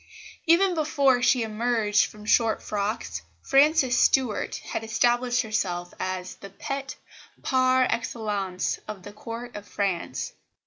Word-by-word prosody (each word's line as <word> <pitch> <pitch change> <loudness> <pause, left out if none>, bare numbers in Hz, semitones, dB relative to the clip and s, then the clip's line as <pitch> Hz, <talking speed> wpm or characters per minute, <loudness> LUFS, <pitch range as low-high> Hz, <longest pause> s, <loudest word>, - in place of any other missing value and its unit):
Even 360 +3 +5
before 285 -5 +2
she 255 -1 +3
emerged 220 -1 +1
from 210 0 -13
short 225 +1 +2
frocks, 200 - -3 0.2
Frances 275 -2 +4
Stuart 250 -6 +2
had - - -4
established 240 +3 +2
herself 180 -5 -2
as 185 -1 -4
the 200 - -10
pet 275 +6 -5 0.5
par 255 0 +3
excellence 205 -5 -2
of 210 -3 -7
the 205 - -10
Court 230 +3 -8
of 205 -1 -8
France. 195 -4 -2
225 Hz, 125 wpm, -26 LUFS, 205-255 Hz, 0.5 s, Even